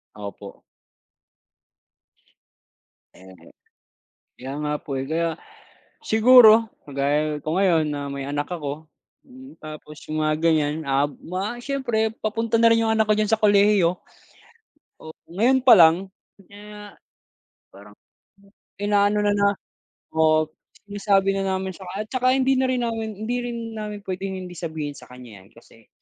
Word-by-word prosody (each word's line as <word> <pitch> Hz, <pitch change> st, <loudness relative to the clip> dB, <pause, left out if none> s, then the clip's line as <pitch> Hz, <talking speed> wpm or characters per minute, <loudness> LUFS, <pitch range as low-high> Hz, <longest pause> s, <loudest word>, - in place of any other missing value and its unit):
Opo. 100 Hz, -1 st, -10 dB, 2.5 s
Oho. 90 Hz, -2 st, -17 dB, 0.8 s
Kaya 130 Hz, +2 st, -8 dB
nga 150 Hz, -, -2 dB
po 135 Hz, -2 st, -5 dB
eh. 135 Hz, -, -4 dB
Kaya, 165 Hz, +2 st, -2 dB, 0.7 s
siguro, 225 Hz, -, +6 dB, 0.2 s
kagaya 145 Hz, +2 st, -1 dB
ko 155 Hz, +3 st, -4 dB
ngayon, 175 Hz, -5 st, +2 dB
na 145 Hz, -1 st, -4 dB
may 140 Hz, 0 st, -6 dB
anak 145 Hz, +3 st, -4 dB
ako, 150 Hz, -3 st, -5 dB, 0.4 s
hmm, 265 Hz, +1 st, -15 dB
tapos 155 Hz, 0 st, -11 dB, 0.2 s
yung 155 Hz, -, -2 dB
mga 155 Hz, 0 st, +1 dB
ganyan, 155 Hz, -3 st, +2 dB
ah, 140 Hz, 0 st, +1 dB
mga 195 Hz, -, -6 dB
siyempre, 240 Hz, -6 st, -1 dB
papunta 225 Hz, +1 st, -1 dB
na 230 Hz, -, +5 dB
rin 230 Hz, 0 st, +3 dB
yung 225 Hz, -, +1 dB
anak 220 Hz, -1 st, +1 dB
ko 215 Hz, -, +3 dB
diyan 215 Hz, 0 st, -1 dB
sa 220 Hz, -, +2 dB
kolehiyo. 205 Hz, -4 st, +3 dB, 1.0 s
Oh, 160 Hz, 0 st, -11 dB, 0.2 s
ngayon 245 Hz, +9 st, +2 dB
pa 245 Hz, -5 st, +7 dB
lang, 170 Hz, +3 st, +5 dB, 0.4 s
kaya 210 Hz, 0 st, -12 dB, 0.8 s
parang 105 Hz, +1 st, -15 dB, 0.8 s
inaano 205 Hz, 0 st, +1 dB
na, 205 Hz, -, +2 dB
na, 200 Hz, 0 st, +2 dB, 0.7 s
um, 155 Hz, 0 st, +3 dB, 0.4 s
sinasabi 195 Hz, -1 st, +1 dB
na 195 Hz, -, -2 dB
namin 190 Hz, -1 st, -3 dB
saka 190 Hz, -2 st, -10 dB
at -, -, -46 dB
saka, 255 Hz, +1 st, +1 dB
hindi 265 Hz, 0 st, +2 dB
na 260 Hz, -, +2 dB
rin 255 Hz, -, -1 dB
namin 225 Hz, -2 st, -3 dB, 0.2 s
hindi 245 Hz, +2 st, -1 dB
rin 240 Hz, -1 st, -5 dB, 0.2 s
namin 210 Hz, -1 st, -6 dB
puwedeng 190 Hz, 0 st, -5 dB
hindi 180 Hz, -1 st, -9 dB
sabihin 155 Hz, -3 st, -5 dB
sa -, -, -14 dB
kanya 120 Hz, -6 st, -13 dB
yan, -, -, -21 dB
kasi 115 Hz, -1 st, -21 dB
190 Hz, 145 wpm, -23 LUFS, 150-220 Hz, 2.5 s, pa